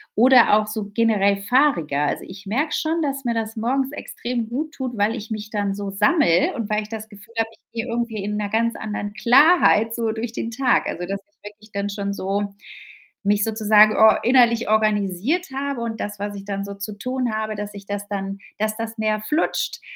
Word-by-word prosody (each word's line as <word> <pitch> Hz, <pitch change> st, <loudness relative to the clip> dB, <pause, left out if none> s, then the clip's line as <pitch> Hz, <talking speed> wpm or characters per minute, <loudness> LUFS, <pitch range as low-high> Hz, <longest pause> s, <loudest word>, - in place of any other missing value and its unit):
oder 245 Hz, -1 st, +6 dB
auch 215 Hz, 0 st, 0 dB
so 215 Hz, -2 st, -5 dB
generell 205 Hz, -3 st, +3 dB
fahriger. 200 Hz, -, +2 dB
Also, 145 Hz, -, -1 dB
ich 195 Hz, +2 st, -11 dB
merke 280 Hz, +10 st, -1 dB
schon, 325 Hz, +1 st, 0 dB
dass 275 Hz, -3 st, -2 dB
mir 235 Hz, -, +1 dB
das 225 Hz, 0 st, -3 dB
morgens 260 Hz, +4 st, 0 dB
extrem 240 Hz, -5 st, -4 dB
gut 300 Hz, +7 st, -3 dB
tut, 255 Hz, -5 st, -4 dB
weil 205 Hz, +3 st, +1 dB
ich 220 Hz, -1 st, -8 dB
mich 215 Hz, 0 st, -5 dB
dann 205 Hz, -2 st, -1 dB
so 200 Hz, 0 st, -5 dB
sammele 200 Hz, -, +3 dB
und 230 Hz, -3 st, -4 dB
weil 215 Hz, 0 st, 0 dB
ich 210 Hz, -, -12 dB
das 220 Hz, -1 st, -7 dB
Gefühl 205 Hz, +2 st, -15 dB
habe, 225 Hz, 0 st, +1 dB
ich -, -, -22 dB
gehe 230 Hz, +1 st, -3 dB
irgendwie 230 Hz, -3 st, -2 dB
in 210 Hz, +1 st, -3 dB
'ner 205 Hz, -1 st, -2 dB
ganz 230 Hz, +2 st, +1 dB
anderen 210 Hz, -1 st, -4 dB
Klarheit 240 Hz, -, +5 dB
so 230 Hz, -2 st, -1 dB
durch 225 Hz, +1 st, -4 dB
den 230 Hz, 0 st, -4 dB
Tag. 250 Hz, +1 st, +2 dB
Also, 175 Hz, -, -4 dB
dass 195 Hz, +2 st, -3 dB
ich -, -, -47 dB
wirklich 215 Hz, +1 st, -20 dB
dann 200 Hz, 0 st, -2 dB
schon 200 Hz, -1 st, -3 dB
so 200 Hz, +1 st, -2 dB, 0.7 s
mich 205 Hz, 0 st, +2 dB
sozusagen 215 Hz, -1 st, +4 dB
or 220 Hz, 0 st, +6 dB
innerlich 240 Hz, -2 st, +4 dB
organisiert 215 Hz, -, +1 dB
habe 275 Hz, -2 st, -3 dB
und 225 Hz, -1 st, -4 dB
das, 205 Hz, -1 st, -5 dB
was 205 Hz, 0 st, -4 dB
ich 200 Hz, 0 st, -8 dB
dann 200 Hz, -1 st, -3 dB
so 200 Hz, 0 st, -7 dB
zu 200 Hz, +1 st, -7 dB
tun 255 Hz, +1 st, -2 dB
habe, 215 Hz, 0 st, -2 dB
dass 205 Hz, 0 st, -6 dB
ich 200 Hz, -1 st, -10 dB
das 205 Hz, 0 st, -4 dB
dann 195 Hz, -1 st, -4 dB, 0.2 s
dass 215 Hz, +1 st, -1 dB
das 225 Hz, 0 st, -5 dB
mehr 215 Hz, -1 st, 0 dB
flutscht, 300 Hz, +10 st, -1 dB
215 Hz, 210 wpm, -22 LUFS, 205-235 Hz, 0.7 s, oder